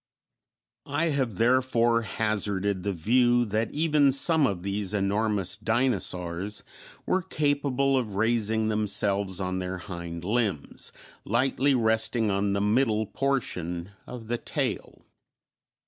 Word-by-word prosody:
I 165 +1 0
have 135 -8 -1
therefore 120 0 +2
hazarded 100 -3 -1
the 100 - -2
view 120 +7 +2
that 110 +1 -1
even 150 -2 +3
some 150 +2 +4
of 90 -5 -4
these 100 0 -1
enormous 100 -1 0
dinosaurs 105 -5 -1 0.4
were 185 - +1
capable 145 -5 0
of 115 -6 -2
raising 110 0 +1
themselves 100 -2 +1
on 95 -1 -2
their 95 0 -4
hind 85 -2 -7
limbs, 105 - -1 0.3
lightly 135 +4 +1
resting 110 -1 +1
on 100 0 0
the 100 - 0
middle 110 0 +2
portion 95 -10 -2 0.2
of 120 -2 -8
the 120 +1 -2
tail. - - -4
110 Hz, 115 wpm, -26 LUFS, 100-125 Hz, 0.4 s, some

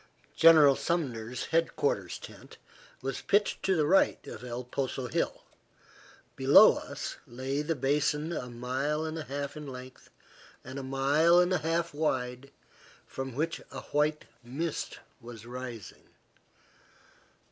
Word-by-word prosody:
General 155 -4 +7
Sumner's 125 -9 -2
head 165 0 +2
quarters 100 -11 -1
tent - - -13 0.5
was 135 -1 -3
pitched 205 +1 +1
to 190 - +2
the 155 -3 +2
right 190 +6 +3
of - - -9
El 125 0 -5
Poso 130 +1 -3
hill. 120 - -2 0.9
Below - - +7
us - - -6
lay 130 +4 -3
the 160 +2 -1
basin 150 +3 0
a 125 -6 -4
mile 130 +6 -2
and 160 0 -4
a 155 - -6
half 140 +1 -4
in 150 -1 -8
length, 130 -1 -10 0.5
and 130 +2 -7
a - - -4
mile 140 +6 +3
and 180 +1 +4
a 180 - +2
half 165 +1 -1
wide, 130 -3 -2 0.6
from 135 -2 -6
which 165 +4 -2
a 130 - -7
white 150 +1 +1 0.2
mist 145 +7 -4 0.2
was 115 -2 -10
rising. 120 -3 -8
140 Hz, 135 wpm, -29 LUFS, 125-155 Hz, 0.9 s, General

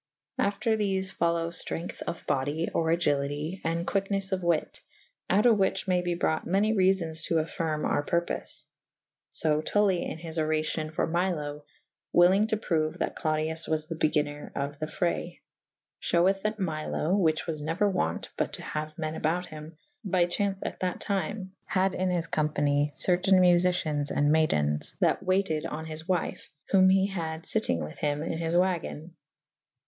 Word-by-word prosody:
After 210 +3 +1
thefe 195 -3 -1
folowe 170 0 +1
Itrength 170 0 -5
of 170 - -5
body 145 +5 0
/ - - -21
or 165 - +1
agylite 150 +1 0
/ - - -29
and 165 +1 -1
quicknes 195 0 -1
of 190 -1 0
wyt 170 -3 0 0.2
/ - - -42
out 205 +4 +3
of 230 -3 +6
whiche 195 +1 +1
may 180 -1 +2
be 175 -1 -1
brought 160 -2 0
many 200 +4 +2
reafons 185 -5 +1
to 165 - 0
affyrme 160 -1 -1
our 145 - +1
purpofe. 170 +3 -2 0.6
So 155 -1 0
Tully 195 0 +2
in - - -4
his 165 0 -4
oracyon 155 0 -1
for - - 0
Milo 160 -4 -2 0.2
/ - - -17
wyllynge 190 +5 +6
to 220 - 0
proue 155 -7 0
that - - -2
Clodius 155 +1 -1
was 155 -1 0
the 165 - -5
begynner 150 -2 0
of 140 +1 -3
the 155 - -2
fraye 85 - -2 0.3
/ - - -65
fheweth 190 +3 +2
that 215 +1 -1
Milo 160 0 -1
(which 160 -6 +2
was 155 -3 -3
neuer 165 +7 +1
wo«t 85 - -1
but - - -1
to - - -5
haue 155 0 -4
men 155 -1 -2
about 165 +3 -1
hym) 155 0 -10 0.3
by 185 -3 +2
chaunce 195 +2 -2
at - - -4
that 180 -1 -2
tyme 200 -1 -2
had 190 0 +1
in 185 0 0
his 175 -2 0
company 145 -2 +1
certayne 185 +2 +3
Muficiens 175 -5 +3
and 145 +1 +2
maydens 75 - +1
that - - +2
wayted 185 -5 +1
on 160 +1 -5
his 160 0 -7
wyfe 185 -3 -2
/ - - -51
whom 190 -1 +6
he 190 0 +4
had 165 -5 -4
fyttyng 175 - 0
with 75 0 -8
hym 145 0 0
in 165 0 -3
his 165 0 -1
wagen. 175 -2 0
165 Hz, 175 wpm, -28 LUFS, 155-190 Hz, 0.6 s, of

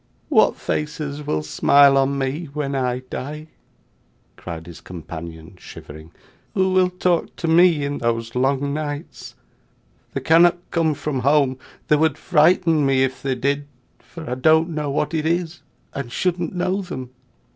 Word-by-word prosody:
'What - - +4
faces 150 -1 -4
will 75 0 -1
smile 140 - +5
on 135 +1 +2
me 135 +5 -2
when 145 -2 -3
I 125 -2 -1
die!' 150 +4 -6 0.9
cried 80 -2 -8
his 85 -1 -11
companion, 85 0 -9
shivering. 80 +2 -11 0.5
'Who 190 -1 +2
will 185 -1 +4
talk 180 -1 -1
to 170 - -4
me 165 -3 +4
in 145 0 -3
those 115 -1 -2
long 135 +2 0
nights! 150 0 -6 0.8
They - - -3
cannot 170 +2 +5
come 160 -3 +1
from 140 -2 -3
home; 135 -1 +2 0.3
they 150 - +4
would 155 -1 +1
frighten 165 -1 +3
me, 135 -1 +3
if 130 0 -2
they 135 -2 -1
did, 140 +3 -1 0.3
for 160 -2 -11
I - - -2
don't 160 +6 +3
know 150 -3 -3
what 150 +2 -1
it 160 -1 0
is, 170 0 -2 0.3
and 140 -4 -5
shouldn't 175 +3 -1
know 185 +2 0
them. 130 -9 -7
145 Hz, 155 wpm, -21 LUFS, 130-160 Hz, 0.9 s, smile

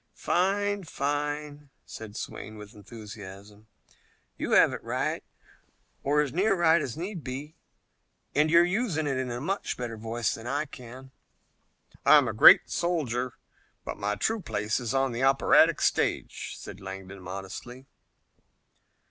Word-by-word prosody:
"Fine! 200 +2 0
Fine!" 145 0 -3 0.2
said 110 -2 -9
Swayne 110 0 -7
with 105 -1 -11
enthusiasm. 105 -1 -11 0.7
"You - - -2
have - - +6
it - - -7
right, - - -2 0.8
or 145 +2 +2
as 140 -4 -2
near 195 +4 +2
right 170 -2 +4
as 135 0 -5
need 175 -1 -5
be, 140 +4 -6 0.8
and 150 +2 +3
you're 170 +2 +6
using 180 -5 -1
it 135 -2 -1
in 130 -1 -2
a 120 0 -4
much 195 +9 -3
better 120 -2 -5
voice 115 +1 -2
than 115 +1 -8
I 145 +4 -1
can." 130 -1 -12 0.9
"I'm - - +6
a - - -2
great - - +8
soldier, 130 -8 -1 0.5
but - - -4
my 105 +1 -1
true 220 - -1
place 105 - -1
is 125 +1 -3
on 135 -1 +2
the 120 +1 -4
operatic 135 0 +5
stage," - - -1
said 95 - -9
Langdon 95 0 -8
modestly. 100 +8 -8
130 Hz, 140 wpm, -28 LUFS, 110-155 Hz, 0.9 s, great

